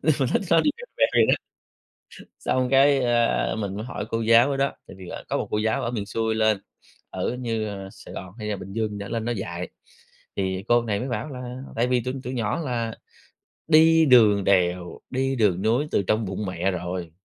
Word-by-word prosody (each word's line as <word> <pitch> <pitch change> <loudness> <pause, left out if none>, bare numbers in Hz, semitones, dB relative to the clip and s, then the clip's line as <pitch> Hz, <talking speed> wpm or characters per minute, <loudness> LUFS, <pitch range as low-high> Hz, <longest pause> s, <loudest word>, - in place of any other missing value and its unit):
Nhưng 155 - +3
mà 135 - +3
nó - - +3
nó 165 - +6
đi 295 - +2
veo 475 - -9
veo - - +4
vậy - - +5
đó. - - +5 1.1
Xong 130 0 +1
cái, 135 +1 +5
ờ, 120 -2 +1
mình 100 -2 -3
mới 105 - -4
hỏi 125 - -5
cô 115 - -1
giáo 115 +4 +5
ở 140 - 0
đó, 140 0 +1
tại - - -11
vì, 95 -2 -10
ờ, - - -7
có - - 0
một - - -3
cô 105 - 0
giáo 110 +1 0
ở 120 - -1
miền 105 -4 -3
xuôi 110 +2 -1
lên, 110 -1 +2 0.5
ở 125 - -2
như 115 -3 -2 0.3
Sài - - -12
Gòn 90 -1 -7
hay 105 -2 -5
là 105 - -1
Bình 95 0 -9
Dương 110 0 -1
gì 105 - -6
đó 100 -1 -6
lên 115 +1 -3
đó 120 - -1
dạy, 90 -5 -5 0.7
thì 95 -1 -2
cô 120 0 +4
này 105 -3 -2
mới 130 - -3
bảo 125 +4 -3
là 125 -1 -7 0.2
tại 115 +2 +2
vì 125 0 +2
tụi 125 +2 -4
tụi 125 - -4
nhỏ 115 +6 -1
là 120 -6 -2 0.7
đi 160 0 +6
đường 110 -7 +6
đèo, 90 -2 +1
đi 135 +1 0
đường 100 -5 +2
núi 120 +7 +2
từ - - +2
trong 110 +3 0
bụng 100 +2 -4
mẹ 90 +1 -1
rồi. 90 -2 -4
115 Hz, 230 wpm, -24 LUFS, 100-125 Hz, 1.1 s, nó